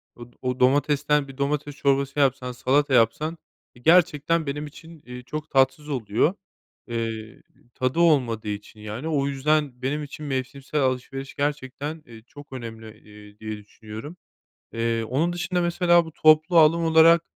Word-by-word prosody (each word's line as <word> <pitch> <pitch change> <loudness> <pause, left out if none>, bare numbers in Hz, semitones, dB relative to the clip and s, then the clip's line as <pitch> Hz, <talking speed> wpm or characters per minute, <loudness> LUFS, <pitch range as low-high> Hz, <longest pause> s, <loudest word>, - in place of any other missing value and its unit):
o 120 - -10 0.2
o 125 -1 -2
domatesten 145 +2 +2
bir 135 0 -12
domates 145 +1 -2
çorbası 140 0 0
yapsan, 130 -2 +1
salata 135 +3 +1
yapsan, 150 +8 +2 0.4
eee, 120 - -18
gerçekten 165 -1 +3
benim 145 +2 -3
için, 160 +1 -14
eee, 125 0 -9
çok 150 +4 -6
tatsız 140 +3 +2
oluyor. 120 - 0 0.5
Eee, 115 -1 -5 0.3
tadı 130 +6 -1
olmadığı 125 -10 +2
için, 105 +1 -7
yani, 105 +7 -6
o 145 -3 0
yüzden 140 -1 0
benim 145 +3 -2
için 150 +1 -8
mevsimsel 140 +2 -3
alışveriş 135 +1 -3
gerçekten, 145 +2 -3
eee, 115 -2 -13
çok 145 0 -13
önemli, 115 -3 -8
eee, 105 0 -16
diye 110 -1 -5
düşünüyorum. 110 - -10 0.6
Eee, 115 0 -1
onun 145 +10 0
dışında, 175 0 -1
mesela, 175 0 +3
bu 160 - -10
toplu 155 +2 +4
alım 165 +2 +5
olarak, 165 +1 +6
140 Hz, 150 wpm, -24 LUFS, 125-155 Hz, 0.6 s, olarak